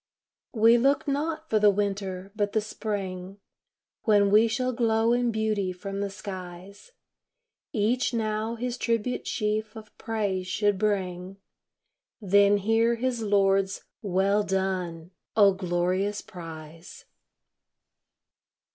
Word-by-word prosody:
We 230 Hz, +2 st, +6 dB
look 275 Hz, +4 st, +2 dB
not 310 Hz, +3 st, -2 dB
for 220 Hz, -, +2 dB
the 210 Hz, 0 st, +6 dB
Winter, 195 Hz, -1 st, -2 dB
but 205 Hz, -1 st, -1 dB
the 220 Hz, -, +3 dB
Spring, 195 Hz, -3 st, -5 dB, 0.7 s
When 205 Hz, -2 st, +4 dB
we 215 Hz, +2 st, +6 dB
shall 255 Hz, +2 st, -1 dB
glow 230 Hz, -1 st, +2 dB
in 245 Hz, 0 st, +1 dB
beauty 215 Hz, -3 st, -1 dB
from 195 Hz, +2 st, -6 dB
the 200 Hz, 0 st, -2 dB
skies; 190 Hz, -, -9 dB, 0.8 s
Each 230 Hz, +4 st, +1 dB
now 220 Hz, 0 st, -2 dB
his 245 Hz, +1 st, -4 dB
tribute 230 Hz, +1 st, -1 dB
sheaf 215 Hz, 0 st, -2 dB
of 215 Hz, -1 st, -12 dB
praise 200 Hz, -5 st, -2 dB
should 205 Hz, 0 st, +1 dB
bring, 190 Hz, -2 st, -2 dB, 0.8 s
Then 200 Hz, 0 st, +4 dB
hear 225 Hz, +3 st, +2 dB
his 240 Hz, 0 st, -2 dB
Lord's 195 Hz, -2 st, +2 dB, 0.2 s
"Well 200 Hz, +1 st, +1 dB
done!" 185 Hz, -4 st, -2 dB, 0.3 s
O 200 Hz, -2 st, +6 dB
glorious 185 Hz, +2 st, -1 dB
prize. 165 Hz, -1 st, -11 dB
205 Hz, 115 wpm, -27 LUFS, 190-225 Hz, 0.8 s, We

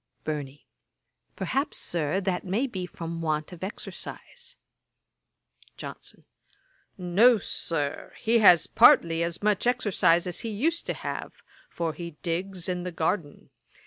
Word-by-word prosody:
BURNEY. 145 Hz, -2 st, -5 dB, 0.7 s
'Perhaps, 280 Hz, +3 st, 0 dB
Sir, 170 Hz, +1 st, +2 dB
that 185 Hz, -2 st, -1 dB
may 200 Hz, +8 st, 0 dB
be 185 Hz, -8 st, -5 dB
from 165 Hz, -1 st, -6 dB
want 155 Hz, 0 st, -1 dB
of 180 Hz, 0 st, -10 dB
exercise.' 345 Hz, -, -6 dB, 1.2 s
JOHNSON. -, -, -9 dB, 0.7 s
'No, 200 Hz, +7 st, +5 dB
Sir; 150 Hz, -6 st, -4 dB
he 230 Hz, +1 st, +3 dB
has 180 Hz, -6 st, +7 dB
partly 165 Hz, 0 st, +5 dB
as 170 Hz, +3 st, -2 dB
much 210 Hz, +2 st, +2 dB
exercise 205 Hz, -8 st, +3 dB
as 180 Hz, -2 st, -3 dB
he 230 Hz, -, -4 dB
used 305 Hz, +11 st, -1 dB
to -, -, -1 dB
have, -, -, -5 dB, 0.4 s
for 165 Hz, -2 st, -3 dB
he 170 Hz, -2 st, -8 dB
digs 180 Hz, +1 st, -3 dB
in 180 Hz, -1 st, -2 dB
the 180 Hz, 0 st, -4 dB
garden. 160 Hz, -2 st, -2 dB
180 Hz, 130 wpm, -27 LUFS, 165-210 Hz, 1.2 s, has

